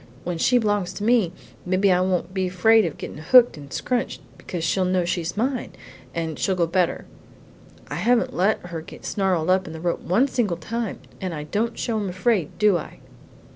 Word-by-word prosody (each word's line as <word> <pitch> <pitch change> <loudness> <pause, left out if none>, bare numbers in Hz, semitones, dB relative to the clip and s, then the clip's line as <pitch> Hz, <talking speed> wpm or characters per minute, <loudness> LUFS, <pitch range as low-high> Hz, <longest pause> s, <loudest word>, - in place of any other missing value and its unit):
When 175 -1 -3
she 250 - +4
b'longs 205 -5 0
to 205 - -6
me, 225 -6 +3 0.3
mebbe 185 +2 0
I 180 -2 +4
won't 185 -1 -1
be 190 -1 0
so 180 - -12
fraid 220 +3 +5
of 165 - -4
gettin' - - -7
hooked 240 +10 +6
and 140 -2 -11
scrunched, 250 - -2 0.2
because 175 -3 -6
she'll 190 +3 +1
know 180 -1 +1
she's 175 +1 -2
mine, 255 +2 -1 0.4
and 160 -2 -3
she'll 190 - +1
go 175 -2 +2
better. 175 +1 0 0.8
I - - -7
haven't 245 +1 +2
let 195 +5 +2
her 170 -2 -5
get - - -12
snarled 185 -4 +1
up 185 0 +2
in 160 - -7
the 160 - -7
rope 170 +1 -1
one 220 +10 +2
single 215 -10 0
time, 225 +6 -4 0.2
and 185 -3 -3
I 150 - -5
don't 210 +10 -2
show 230 -3 -1
I'm 200 -2 -2
afraid, 185 -2 0
do 210 -4 +4
I?" - - -10
185 Hz, 205 wpm, -23 LUFS, 170-220 Hz, 0.8 s, hooked